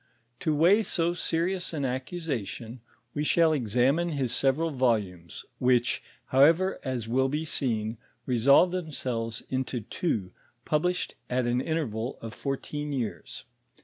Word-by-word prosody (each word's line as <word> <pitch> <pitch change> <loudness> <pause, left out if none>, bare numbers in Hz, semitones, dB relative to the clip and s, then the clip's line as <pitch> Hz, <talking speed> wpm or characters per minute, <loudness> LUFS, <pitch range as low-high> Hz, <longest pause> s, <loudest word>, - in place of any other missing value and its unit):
To 155 -3 0
weigh 180 +8 +5
so 170 -5 +1
serious 175 +2 -1
an 145 -3 -1
accusation, 130 - -4 0.3
we 150 - -1
shall 160 +1 +4
examine 135 +6 +2
hia 135 -4 -1
several 140 +7 +1
volumes, 105 - -1
which, 125 -1 +2 0.3
however, 165 +8 +4
as 125 -4 -3
will 130 +3 +2
bo 150 +3 -1
seen, 115 -7 -1 0.3
resolve 140 +8 +5
themselves 125 -10 -3
into 130 -1 -1
two, 105 - -2 0.3
published 180 +4 0 0.2
at 125 0 +1
an 120 +1 +1
interval 130 -7 -2
of 115 -1 -7
fourteen 145 +3 -4
years. 125 -6 -4
135 Hz, 125 wpm, -28 LUFS, 120-160 Hz, 0.3 s, weigh